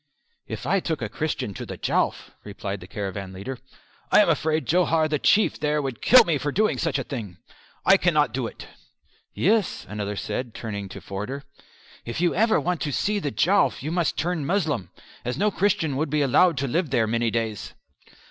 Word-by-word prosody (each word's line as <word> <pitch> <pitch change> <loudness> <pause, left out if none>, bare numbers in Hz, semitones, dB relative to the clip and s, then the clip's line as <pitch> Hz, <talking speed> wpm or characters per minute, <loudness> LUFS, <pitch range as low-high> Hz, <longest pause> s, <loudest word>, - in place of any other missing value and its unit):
"If - - -6
I 195 - +2
took 160 -7 -3
a 105 - -3
Christian 145 -5 -3
to - - -6
the - - -7
Jowf," - - -1
replied - - -5
the - - -11
caravan 100 -1 -5
leader, 120 +7 -6 0.5
"I - - +7
am 205 - +3
afraid 155 0 +1
Johar 165 -2 +2
the 150 -1 -1
Chief 215 +8 +3
there 150 0 +1
would 135 -5 -4
kill 250 -1 +8
me 165 -8 0
for 145 +2 -2
doing 215 +7 +1
such 165 -4 0
a - - -2
thing. 105 - -6 0.5
I - - +7
cannot - - +2
do - - -1
it." - - -10 0.7
"Yes," 210 +1 +1
another 105 -1 -4
said, 120 +3 -4
turning 100 -3 -5
to - - -9
Forder, 105 +9 -5 0.6
"if 115 - -5
you 175 0 +2
ever 220 +4 +3
want 180 -2 -1
to 145 - -1
see 205 +9 0
the 150 - -2
Jowf 190 0 +2
you 155 - -3
must 175 -1 0
turn 175 -2 -1
Moslem, 155 - -1 0.3
as 125 +1 -3
no 210 +5 +2
Christian 185 -8 +1
would 155 +2 -1
be 150 0 +1
allowed 160 +4 +4
to 135 +2 -1
live 165 +5 0
there 120 -4 +2
many 115 +1 0
days." 110 -2 -3
150 Hz, 195 wpm, -24 LUFS, 115-175 Hz, 0.7 s, kill